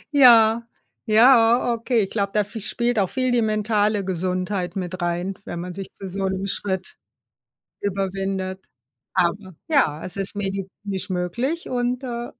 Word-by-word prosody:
Ja, 230 -4 +7 0.5
ja, 235 +1 +5
okay. 230 0 +1
Ich 195 - -5
glaube, 200 -2 -1
da 210 - +4
v 215 +3 -8
spielt 235 +2 0
auch 190 - +1
viel 255 -1 0
die 240 -1 +3
mentale 215 -2 +1
Gesundheit 185 0 -2
mit 185 -1 -4
rein, 175 +3 -1
wenn 175 - -6
man 180 0 -5
sich 195 +1 -7
zu 195 - -10
so 190 +1 -2
'nem 190 +1 -2
Schritt 190 -1 -3 0.8
überwindet. 195 -1 -3 0.5
Aber 185 0 0
ja, 165 - +2
es 185 - -5
ist 195 +1 -3
medizinisch 195 0 -4
möglich 235 - -2
und, 250 +1 -1
äh 240 -1 -4
200 Hz, 150 wpm, -23 LUFS, 185-230 Hz, 0.8 s, Ja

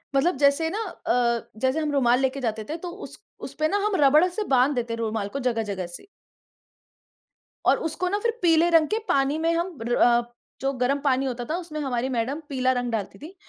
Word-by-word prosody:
मतलब 275 +3 +2
जैसे 285 +3 +3
ना 410 - -3 0.3
अ, 235 -1 +1
जैसे 260 +5 +1
हम 305 -2 -1
रुमाल 250 -3 +3
लेके 265 +1 0
जाते 220 -2 -2
थे 315 - -3
तो 350 +1 -7 0.2
उस - - -13 0.3
उसपे 310 0 -1
ना 405 - 0
हम 420 -2 +1
रबड़ 305 +6 +6
से 380 +4 -3
बाँध 260 +3 +3
देते 235 -1 -2
हैं - - -4
रुमाल 220 -2 -2
को - - 0
जगह-जगह 210 -6 -2
से। - - -18 1.6
और - - +5
उसको 360 +3 -2
ना 410 - 0
फिर 465 +2 -2
पीले 335 0 +4
रंग 325 -2 +4
के 440 - 0
पानी 275 +2 +2
में 330 +1 +1
हम 340 -2 -2
र 240 +1 0
अ, 240 0 +3 0.3
जो 270 +1 0
गरम 260 +3 0
पानी 270 -1 +1
होता 245 -2 -3
था 325 - 0
उसमें 330 -4 -6
हमारी 260 -1 -1
मैडम 255 +4 -2
पीला 260 -1 +1
रंग 245 -1 -2
डालती 210 -4 -4
थी, 330 +7 -11
275 Hz, 215 wpm, -25 LUFS, 245-325 Hz, 1.6 s, रबड़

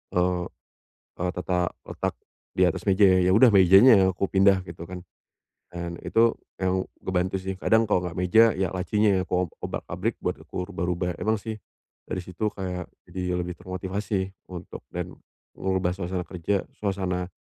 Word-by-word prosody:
Eee 90 0 +1 0.8
eee, 90 0 0
tata 90 -1 0 0.2
letak - - -2 0.4
di 95 - +6
atas 90 - -1
meja 100 +2 +5
ya, 95 -1 +4
ya - - +4
udah 120 +2 +7
mejanya 95 +2 +7
aku 95 +2 -1
pindah 95 -1 +3
gitu 85 0 -9
kan 90 0 -6 0.7
dan 85 -1 -6
itu 115 0 +3 0.2
emang 95 0 -1 0.2
ngebantu 95 0 0
sih. 95 0 -3
Kadang 110 0 +4
kalau 105 -4 +2
enggak 90 0 -5
meja 90 +5 +5
ya 95 -2 -1
lacinya 95 +1 +2
ku 90 0 +1 0.2
obrak-abrik - - -3
buat - - 0
aku 90 - -5
rubah-rubah. 90 0 -1
Emang 110 +1 +1
sih 110 +1 -6 0.5
dari 95 - -2
situ 90 +4 -2
kayak 90 -2 -5 0.2
jadi 90 -1 -2
lebih 90 0 -3
termotivasi 95 +1 -3 0.2
untuk 90 -1 -8
dan - - -4 0.4
ngerubah 95 -1 0
suasana 90 -1 -3
kerja 90 +3 -2 0.2
suasana 95 -3 -1
95 Hz, 155 wpm, -26 LUFS, 90-95 Hz, 0.8 s, udah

